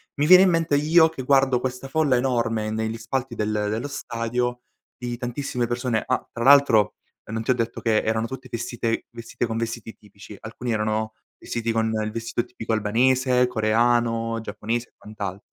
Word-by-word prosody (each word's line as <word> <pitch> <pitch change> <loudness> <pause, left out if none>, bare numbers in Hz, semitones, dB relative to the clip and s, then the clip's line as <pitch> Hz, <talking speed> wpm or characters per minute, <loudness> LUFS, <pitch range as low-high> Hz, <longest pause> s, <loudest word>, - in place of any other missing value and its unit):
mi 145 - +1
viene 180 +3 +9
in 190 - +4
mente 165 -3 +1
io 160 +3 +5
che 160 -5 -7
guardo 135 -1 +3
questa 130 +1 -4
folla 150 -2 +2
enorme 115 -4 0
negli 110 +1 -2
spalti 125 +1 -3
del 105 0 -1 0.2
dello 115 +6 -2
stadio, 120 -1 -3 0.4
di 120 -1 -4
tantissime 125 -1 -3
persone 120 -2 -1
Ah, 130 - -1
tra 115 - -3
l'altro, 135 -6 +5 0.3
non 110 +1 -4
ti 130 - +1
ho - - +5
detto 115 -1 -3
che 110 -2 +2
erano 110 0 0
tutti 130 +2 -8
festite 115 0 -3
vestite 115 +1 -4
con 115 0 -3
vestiti 115 -1 -4
tipici, 105 0 -14
alcuni 115 +2 -5
erano 110 0 -1 0.2
vestiti 115 -1 -3
con 110 0 0
il 110 - -3
vestito 115 +1 -3
tipico 115 -2 -5
albanese, 125 +4 +2
coreano, 115 0 +1
giapponese 115 +3 -3
e - - -37
quant'al 100 -3 -6
115 Hz, 175 wpm, -24 LUFS, 110-130 Hz, 0.4 s, viene